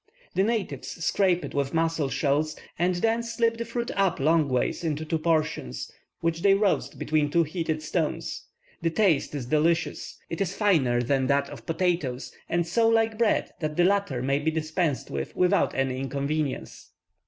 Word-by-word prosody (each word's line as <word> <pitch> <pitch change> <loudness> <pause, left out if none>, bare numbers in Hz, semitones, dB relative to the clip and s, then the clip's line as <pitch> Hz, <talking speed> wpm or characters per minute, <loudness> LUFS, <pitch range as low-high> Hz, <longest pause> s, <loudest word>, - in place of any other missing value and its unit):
The - - +2
natives 220 -1 -1 0.2
scrape 185 -3 +2
it - - -8
with 140 +1 -1
mussel 165 -3 +1
shells, 145 +3 0 0.2
and 180 +1 +2
then 225 +6 +1
split 230 0 0
the 235 - -2
fruit 235 +1 -3
up 195 -3 +1
long 155 +1 +3
ways 125 +6 0
into 155 -1 -2
two 160 +1 -1
portions, 155 - -1 0.3
which 165 0 0
they 195 +1 +5
roast 200 -1 0
between 150 -1 +1
two 170 +3 +3
heated 160 -1 -3
stones. 160 0 -2 0.3
The 165 - +1
taste 165 -6 +2
is 135 -4 -3
delicious; 160 +5 0
it 165 - -4
is 195 -1 -1
finer 135 - +2
than 130 +1 +1
that 140 +1 +1
of - - -11
potatoes, 165 -7 -1 0.2
and 170 0 +1
so 225 +7 +2
like 225 -1 +2
bread 230 -2 +2
that 155 -2 -3
the 175 - +5
latter 195 -10 +1
may 140 +2 +1
be 155 +2 0
dispensed 160 -1 -1
with 70 -1 -4
without 180 +2 +2
any 135 -1 0
inconvenience. 140 +2 -3
160 Hz, 175 wpm, -26 LUFS, 140-190 Hz, 0.3 s, they